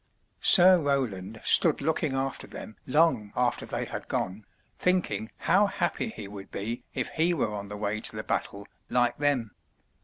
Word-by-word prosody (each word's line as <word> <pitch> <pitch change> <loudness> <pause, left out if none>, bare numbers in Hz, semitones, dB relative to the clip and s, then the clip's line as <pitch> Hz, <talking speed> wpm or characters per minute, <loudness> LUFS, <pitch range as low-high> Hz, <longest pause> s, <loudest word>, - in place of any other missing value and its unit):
Sir 185 -1 +8
Roland 110 -8 -2
stood 165 -4 +5
looking 150 -1 -1
after 135 0 -3
them 110 - -10
long 130 -8 +2
after 125 -1 0
they - - -3
had - - -7
gone, 100 +3 -4 0.3
thinking 180 -11 -1
how 205 +2 +3
happy 185 +4 -2
he 160 - -8
would 100 -1 -10
be 115 +4 -5
if 130 -2 -2
he 170 +2 +1
were 110 -8 -1
on 100 -1 -6
the 105 - -7
way 105 +1 -3
to - - -1
the - - -4
battle 100 0 -4 0.2
like 120 -1 +1
them. 140 -7 0
125 Hz, 165 wpm, -27 LUFS, 105-160 Hz, 0.3 s, Sir